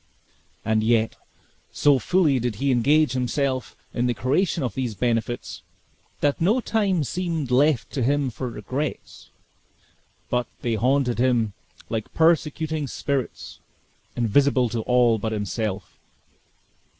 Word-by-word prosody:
And 110 0 +2
yet, 115 0 +2 0.6
so 145 -2 +3
fully 150 - +2
did 120 -2 -2
he 135 +6 0
engage 145 +5 +3
himself 130 +1 -1 0.2
in 125 0 0
the 120 - 0
creation 145 - 0
of 125 - -2
these 125 -5 -3
benefits, 115 +3 -2 0.6
that 145 +1 +1
no 210 +9 +3
time 200 -8 +1
seemed 165 -4 -3
left 135 0 +2
to 135 - -2
him 140 +1 +1
for 125 +3 -5
regrets; 130 +7 -5 1.0
but 125 -1 -1 0.2
they 120 - 0
haunted 125 +2 +1
him 120 -5 +2 0.3
like 110 -2 -4
persecuting 160 -2 +1
spirits, 135 0 -4 0.6
invisible 125 +2 +2
to 115 - -2
all 120 -1 +3
but 110 +2 -2
himself. 105 -2 -4
130 Hz, 125 wpm, -24 LUFS, 115-145 Hz, 1.0 s, so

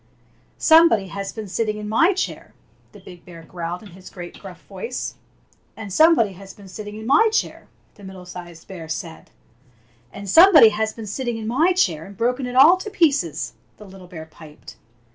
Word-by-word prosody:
"SOMEBODY 315 - +4
HAS 195 +1 -6
BEEN 220 -2 -7
SITTING 215 +2 -2
IN 210 0 -7
MY 330 - +3
CHAIR!" 375 - -5 0.4
the 205 - -15
big 180 -2 -14
bear 170 -2 -13
growled 175 +2 -7
in 205 - -13
his 185 +1 -14
great 175 -2 -10
gruff - - -12
voice. 470 - -6 0.6
"And 210 -4 -8
somebody 310 - +4
has 195 +1 -13
been 200 -1 -15
sitting 210 +2 -9
in 220 0 -9
my 290 - +4
chair!" 445 - -3 0.3
the 205 - -18
middle 190 -1 -11
sized 175 -2 -11
bear 170 -4 -9
said. 165 +1 -4
9 - - -12
Fairy - - -18
Tale - - -32
Bears 120 -1 -35
And 200 0 -8
somebody 325 - +8
has 220 +1 -2
been 225 - -9
sitting 240 +3 -4
in 220 - -7
my 310 +10 +2
chair 165 - 0
and 200 - -14
broken 250 +3 -1
it 250 - -7
all 305 +8 +7
to 395 +3 -7
'pieces!'^ 270 - 0 0.3
the 210 - -13
little 190 -2 -14
bear 160 -3 -10
piped. 155 -1 -15
200 Hz, 200 wpm, -21 LUFS, 175-250 Hz, 0.6 s, somebody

